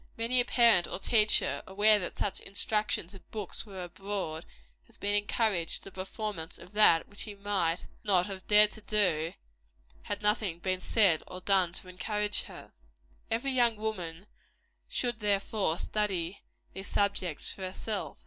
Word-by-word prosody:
Many 235 +2 +2
a - - -2
parent 230 -9 +5
or - - -3
teacher, 210 -8 +3
aware 210 +2 +4
that 180 - -5
such 195 - -1
instructions 205 -2 -2
and 195 - -15
books 215 0 -6
were 190 -3 -7
abroad, 175 -3 -5 0.4
has - - -10
been 205 0 -1
encouraged 205 -4 +1
to - - -6
the 195 - -10
performance 190 -2 -5
of 180 - -14
that 205 -6 +5
which 205 - -15
she 210 -2 -6
might 195 -4 -1 0.2
not 185 -4 +3
have 195 -2 -8
dared 210 0 +7
to 220 - -10
do, 180 -6 +1 0.7
had 205 0 -5
nothing 210 -4 +2
been 185 +1 -2
said 195 -8 +3
or 185 - -7
done 185 -2 +3
to 185 - -7
encourage 210 +3 -1
her. - - -12 0.6
Every 235 +5 0
young 240 -3 +3
woman 190 -5 -4 0.6
should, 240 -3 -1
therefore, 200 -4 +1
study 195 -4 -2 0.3
these 195 +1 -5
subjects 200 -6 0
for - - -12
herself. 195 +3 -4
200 Hz, 160 wpm, -30 LUFS, 180-210 Hz, 0.7 s, dared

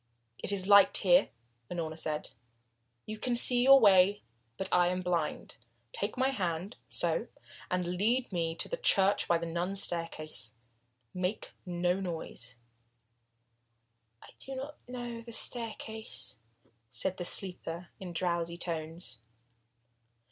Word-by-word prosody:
"It - - -1
is 195 -2 +1
light 200 -1 +7
here," 180 -1 +4 0.4
Unorna 165 -3 -4
said. 155 -1 -3 0.7
"You 215 0 -7
can 245 +2 0
see 245 +1 +6
your 270 +2 +8
way. 200 -2 +5 0.3
But 190 - -2
I 175 -1 +4
am 180 +1 -1
blind. 175 -4 -2 0.4
Take 205 +4 -3
my 260 +1 +2
hand 185 -3 -3
so - - -1 0.4
and 180 -1 0
now 175 - -2
lead 225 +8 0
me 165 -2 -1
to - - 0
the - - -3
church 200 - +3
by 170 - +3
the 170 - -4
nun's 175 +4 -1
staircase. 155 -9 -3 0.6
Make 180 +3 -3 0.2
no 175 +1 0
noise." 160 -9 -5 1.7
"I - - -14
do 270 - -6
not 280 +3 -7
know 240 -2 -6
the 235 0 -11
staircase," 220 - 0 0.5
said 175 +11 -1
the 180 - -3
sleeper 175 -2 0
in 185 -2 -7
drowsy 170 0 -1
tones. 165 -5 -5
180 Hz, 135 wpm, -31 LUFS, 170-215 Hz, 1.7 s, your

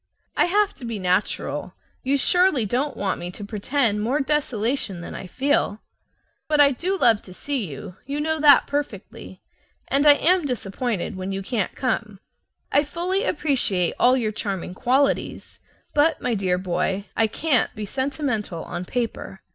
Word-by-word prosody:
I - - +4
have 410 +3 +2
to 270 - -11
be 230 -2 -3
natural. 185 +1 -1 0.3
You 275 +1 +1
surely 355 - +3
don't 260 +7 -1
want 200 -1 -1
me 175 - -5
to 200 +3 -8
pretend 210 +1 0
more 250 +7 0
desolation 255 - -1
than - - -7
I 190 - -7
feel. 260 -1 0 0.7
But 300 -1 +1
I 285 -1 +7
do 365 +9 -1
love 230 - +4
to 185 - -13
see 270 -5 -2
you, 155 +5 -9
you 285 +1 -2
know 315 +1 0
that 290 -2 +7
perfectly, 290 0 -5 0.5
and 280 +2 +3
I 290 - +10
am 340 +2 +2
disappointed 220 -4 -3
when 185 +1 -4
you 195 0 -3
can't 210 -2 -2
come. 215 -5 -2 0.5
I 285 - +4
fully 350 +6 -1
appreciate 250 - +1
all 255 +1 +5
your 220 -4 0
charming 195 -4 -4
qualities, 265 +8 0 0.3
but, 300 +1 +3
my 245 - -1
dear 190 -4 +1
boy, 190 +2 -1
I 225 - +3
CAN'T 270 +3 0
be 215 -1 -4
sentimental 260 - -2
on 180 - -5
paper. 230 -4 -4
245 Hz, 165 wpm, -23 LUFS, 200-290 Hz, 0.7 s, I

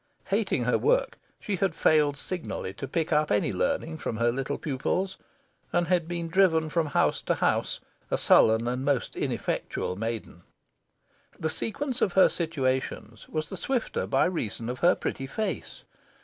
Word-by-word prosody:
Hating - - +1
her - - +2
work, - - +1 0.2
she 200 -2 -2
had 185 -3 0
failed 150 -2 +3
signally 160 - -4
to 135 - -6
pick 160 +3 -1
up 150 0 +2
any 105 0 +1
learning 160 - -1
from 110 - -3
her 120 +1 +2
little 135 +3 -2
pupils, 170 +7 -2 0.5
and 175 -1 +1
had 175 -3 +2
been 170 -1 -3
driven 165 -3 +3
from 165 -1 +1
house - - +1
to - - 0
house, - - 0 0.3
a - - +1
sullen 110 +1 +5
and 125 +2 -1
most 140 -3 0
ineffectual 90 - -2
maiden. 110 -4 -5 1.0
The 160 - 0
sequence 265 - -2
of 190 - +2
her 190 - +6
situations 130 -8 -2
was 155 -1 -3
the - - -5
swifter 255 -4 -1
by - - +3
reason 120 - -2
of 125 - -4
her 175 +1 +5
pretty 135 - -4
face. 215 +10 -4
155 Hz, 165 wpm, -27 LUFS, 125-175 Hz, 1.0 s, her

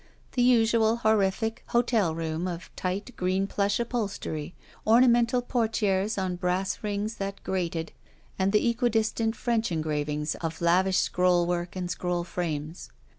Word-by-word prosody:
The 250 - 0
usual 230 -2 +4
horrific 220 0 +1
hotel 230 -8 +2
room 165 +1 -2
of 170 -1 -7
tight 195 +6 -3
green 185 +2 0
plush 200 +1 0
upholstery, 200 -9 -3 0.3
ornamental 240 +1 +4
portieres 220 -4 0
on 185 -2 -1
brass 180 +1 -1
rings 210 +1 -3
that 195 0 -5
grated, 170 -3 -2 0.5
and 190 +1 +2
the 225 +3 +3
eqtiidistant 225 -1 0
French 230 -4 0
engravings 150 -1 -1
of 165 -1 -3
lavish 185 +2 +3
scrollwork 175 -1 +1
and 180 -1 -3
scroll 180 -1 -1
frames. 165 -2 -4
190 Hz, 125 wpm, -27 LUFS, 175-225 Hz, 0.5 s, usual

